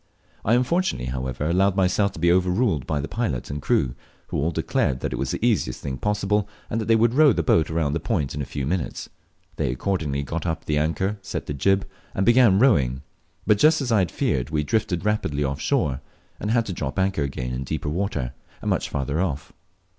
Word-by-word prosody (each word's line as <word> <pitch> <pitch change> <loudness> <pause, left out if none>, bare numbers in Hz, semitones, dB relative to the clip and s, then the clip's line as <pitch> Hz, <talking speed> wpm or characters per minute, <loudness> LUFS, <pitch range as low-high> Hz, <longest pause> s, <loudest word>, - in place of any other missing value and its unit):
I 115 - +3
unfortunately, 125 - 0
however, 65 +2 -3
allowed 95 +3 +2
myself 100 +1 +2
to - - -9
be 85 +1 +4
overruled 90 - +1
by 75 - 0
the 75 - -4
pilot 85 - -2
and 70 0 -4
crew, 65 -2 +1 0.4
who - - -2
all 80 - +1
declared 65 -4 0
that - - -2
it - - -3
was - - -1
the - - -1
easiest 60 - +1
thing 65 -1 -4
possible, 105 0 0 0.2
and 115 - 0
that - - -3
they 115 - +5
would 115 +1 +3
row 145 -1 +6
the 85 - 0
boat 80 0 +3
round 80 -3 0
the 80 - 0
point 80 - -1
in 75 - -3
a - - -2
few 70 0 -4
minutes. 85 +3 -3 0.5
They - - 0
accordingly 70 -1 -1
got 80 +5 -4
up 80 -1 -3
the 75 -1 +1
anchor, 95 +7 -1
set 95 - -5
the - - -4
jib, 95 +9 +1 0.3
and 95 - +1
began 120 -4 +6
rowing; 70 - +3 0.4
but, 105 -1 +3
just 155 +4 +5
as 130 -4 -2
I 110 - +4
had 90 -3 +1
feared, 65 +2 -1
we 75 -1 0
drifted 105 -1 -1
rapidly 80 -9 0
off 70 0 -2
shore, 65 -3 0 0.4
and 105 - -3
had 115 0 +2
to 95 - -4
drop 70 -4 -4
anchor 95 -3 +1
again 65 -3 -3
in 65 +2 -3
deeper 75 +3 -3
water, 75 - -2 0.3
and - - -2
much - - 0
farther 70 +4 -1
off. 75 -7 -3
85 Hz, 220 wpm, -24 LUFS, 70-105 Hz, 0.5 s, row